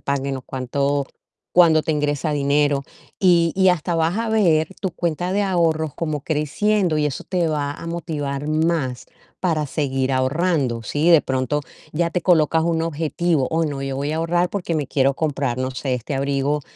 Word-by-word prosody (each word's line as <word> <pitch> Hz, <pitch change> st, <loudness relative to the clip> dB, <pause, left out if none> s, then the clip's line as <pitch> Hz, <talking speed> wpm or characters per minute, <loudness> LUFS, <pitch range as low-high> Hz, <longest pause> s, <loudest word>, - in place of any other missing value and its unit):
paguen 140 Hz, -1 st, -2 dB
o 130 Hz, -, -8 dB
cuánto 140 Hz, +2 st, -1 dB, 0.5 s
cuándo 165 Hz, -3 st, +6 dB
te 160 Hz, -, -2 dB
ingresa 150 Hz, +1 st, -1 dB
dinero. 145 Hz, -1 st, +1 dB, 0.4 s
Y 170 Hz, -3 st, +4 dB
y 190 Hz, -1 st, +5 dB
hasta 170 Hz, 0 st, -1 dB
vas 165 Hz, +3 st, +1 dB
a 230 Hz, 0 st, -1 dB
ver 170 Hz, -8 st, +3 dB
tu 190 Hz, -, -1 dB
cuenta 175 Hz, +2 st, -2 dB
de 205 Hz, +1 st, +1 dB
ahorros 165 Hz, -5 st, +1 dB
como 155 Hz, -3 st, -3 dB
creciendo 165 Hz, +5 st, 0 dB
y 150 Hz, -1 st, +2 dB
eso 140 Hz, -, -4 dB
te 175 Hz, -3 st, 0 dB
va 145 Hz, -2 st, -1 dB
a 165 Hz, -, -9 dB
motivar 145 Hz, -4 st, -4 dB
más 155 Hz, -4 st, 0 dB, 0.3 s
para 160 Hz, -5 st, 0 dB
seguir 135 Hz, -2 st, -1 dB
ahorrando. 130 Hz, -3 st, 0 dB
Sí, 150 Hz, +8 st, +1 dB
de 165 Hz, -3 st, +7 dB
pronto 130 Hz, +2 st, -1 dB, 0.3 s
ya 170 Hz, +2 st, 0 dB
te 175 Hz, 0 st, -2 dB
colocas 160 Hz, -2 st, +3 dB
un 165 Hz, -1 st, 0 dB
objetivo: 165 Hz, -2 st, 0 dB
"Oh, 165 Hz, 0 st, +1 dB
no, 140 Hz, -3 st, -3 dB
yo 135 Hz, -1 st, -3 dB
voy 145 Hz, +2 st, -2 dB
a -, -, -2 dB
ahorrar 175 Hz, +2 st, +1 dB
porque 180 Hz, -4 st, -3 dB
me 150 Hz, -, -2 dB
quiero 135 Hz, 0 st, +2 dB
comprar, 140 Hz, -5 st, -1 dB
no 130 Hz, 0 st, -2 dB
sé, 130 Hz, +1 st, -3 dB
este 125 Hz, +3 st, -4 dB
abrigo 140 Hz, +2 st, 0 dB
150 Hz, 185 wpm, -21 LUFS, 140-170 Hz, 0.5 s, de